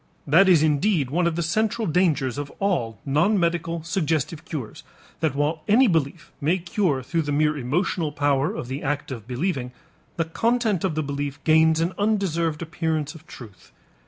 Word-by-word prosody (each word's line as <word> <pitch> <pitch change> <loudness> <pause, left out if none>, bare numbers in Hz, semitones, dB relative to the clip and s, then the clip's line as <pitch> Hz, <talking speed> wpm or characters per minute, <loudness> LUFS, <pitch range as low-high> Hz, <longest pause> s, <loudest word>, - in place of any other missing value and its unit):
That 170 +7 +5
is 165 -4 +5
indeed 155 -2 +1
one 170 +3 +2
of 170 - -1
the 170 - -1
central 220 +6 0
dangers 155 -6 +1
of 145 -1 -5
all 145 - -1
non 170 +10 +2
medical 170 -1 -1
suggestive 160 -3 -1
cures, 135 -9 -6 0.4
that 155 -3 0
while 150 +3 0
any 230 +6 +5
belief 160 -2 -1
may 160 +6 +2
cure 170 -6 -1
through 165 +5 -1
the 145 -2 -3
mere 150 +1 +2
emotional 150 +4 -1
power 145 -1 +1
of - - -6
the 135 +3 -4
act 145 0 -2
of 115 -4 -7
believing, 130 -1 -2 0.5
the 165 - +1
content 225 +2 0
of 185 -5 0
the 155 - 0
belief 140 0 -4
gains 160 0 +4
an 170 +3 0
undeserved 170 -7 0
appearance 160 -2 -2
of 160 -1 -15
truth. 110 -6 -13
160 Hz, 175 wpm, -24 LUFS, 145-175 Hz, 0.5 s, That